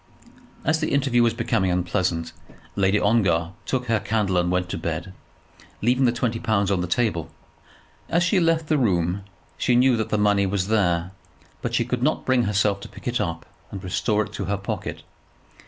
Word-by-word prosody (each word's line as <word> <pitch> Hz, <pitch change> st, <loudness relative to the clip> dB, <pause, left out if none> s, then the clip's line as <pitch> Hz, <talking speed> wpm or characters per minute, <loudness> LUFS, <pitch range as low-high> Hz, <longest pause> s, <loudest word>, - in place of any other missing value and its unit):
As 160 Hz, +2 st, +2 dB
the 155 Hz, -, -1 dB
interview 135 Hz, -3 st, +3 dB
was 115 Hz, -1 st, +2 dB
becoming 115 Hz, -5 st, 0 dB
unpleasant, 90 Hz, -1 st, -1 dB, 0.4 s
Lady 100 Hz, +1 st, +2 dB
Ongar 95 Hz, -6 st, +2 dB, 0.2 s
took 125 Hz, -2 st, -1 dB
her 115 Hz, -2 st, +1 dB
candle 105 Hz, -4 st, 0 dB
and 90 Hz, 0 st, 0 dB
went 90 Hz, 0 st, +1 dB
away -, -, -19 dB
to 95 Hz, -, -2 dB
bed, 85 Hz, +3 st, -4 dB, 0.7 s
leaving 125 Hz, +4 st, +2 dB
the 120 Hz, -, +4 dB
twenty 120 Hz, -1 st, -1 dB
pounds 100 Hz, -3 st, +1 dB
on 95 Hz, -3 st, +1 dB
the 90 Hz, -, -2 dB
table. 85 Hz, -6 st, 0 dB, 0.8 s
As 170 Hz, +1 st, +2 dB
she 180 Hz, +3 st, +3 dB
left 165 Hz, -2 st, +2 dB
the 155 Hz, -2 st, +2 dB
room 90 Hz, -5 st, +1 dB, 0.4 s
she 125 Hz, -, +2 dB
knew 125 Hz, +1 st, +5 dB
that 110 Hz, 0 st, -2 dB
the 105 Hz, -, +1 dB
money 105 Hz, -1 st, +3 dB
was 95 Hz, 0 st, -1 dB
there, 90 Hz, -5 st, +1 dB, 0.5 s
but 120 Hz, -1 st, -2 dB
she 120 Hz, -, +2 dB
could 125 Hz, 0 st, -2 dB
not 150 Hz, +5 st, 0 dB
bring 130 Hz, -2 st, +3 dB
herself 100 Hz, 0 st, +1 dB
to -, -, -10 dB
pick -, -, -11 dB
it 120 Hz, -1 st, 0 dB
up 85 Hz, -5 st, -3 dB, 0.2 s
and 95 Hz, -1 st, -7 dB
restore 105 Hz, +3 st, 0 dB
it -, -, -14 dB
to -, -, -4 dB
her 100 Hz, +1 st, -1 dB
pocket. 100 Hz, -, -5 dB
105 Hz, 195 wpm, -24 LUFS, 90-120 Hz, 0.8 s, knew